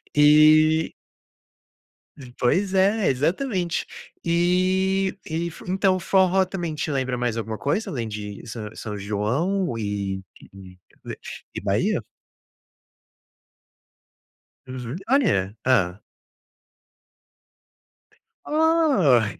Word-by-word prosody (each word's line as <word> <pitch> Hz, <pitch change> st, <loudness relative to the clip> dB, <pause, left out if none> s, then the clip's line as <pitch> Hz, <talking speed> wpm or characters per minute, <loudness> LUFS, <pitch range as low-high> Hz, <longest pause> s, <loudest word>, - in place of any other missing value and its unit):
Eh 155 Hz, +2 st, +5 dB, 1.5 s
Pois 185 Hz, +10 st, +1 dB
é, 195 Hz, +2 st, +3 dB
exatamente. 175 Hz, -, -1 dB, 0.4 s
Eh, 185 Hz, +3 st, +1 dB
e 170 Hz, +2 st, -3 dB
fu -, -, -13 dB
então, 190 Hz, 0 st, +2 dB
o -, -, -5 dB
forró 190 Hz, +1 st, +3 dB
também 175 Hz, -4 st, -4 dB
te 150 Hz, +1 st, -3 dB
lembra 130 Hz, -2 st, -1 dB
mais 120 Hz, -2 st, -1 dB
alguma 110 Hz, -1 st, -4 dB
coisa 150 Hz, -, -1 dB
além 120 Hz, -5 st, -3 dB
de 105 Hz, -1 st, -7 dB
São 110 Hz, -2 st, -6 dB
São 105 Hz, -2 st, -6 dB
João 120 Hz, -, -1 dB
e 100 Hz, -2 st, -3 dB, 0.3 s
d 95 Hz, -2 st, -13 dB, 0.3 s
d -, -, -7 dB, 0.4 s
e -, -, -4 dB
Bahia? -, -, 0 dB, 2.6 s
Uhum. 130 Hz, +1 st, -6 dB
Olha, 175 Hz, -, +2 dB
Hã. 100 Hz, -7 st, +2 dB, 2.5 s
Oh! 300 Hz, -, +3 dB
155 Hz, 95 wpm, -23 LUFS, 115-190 Hz, 2.6 s, Eh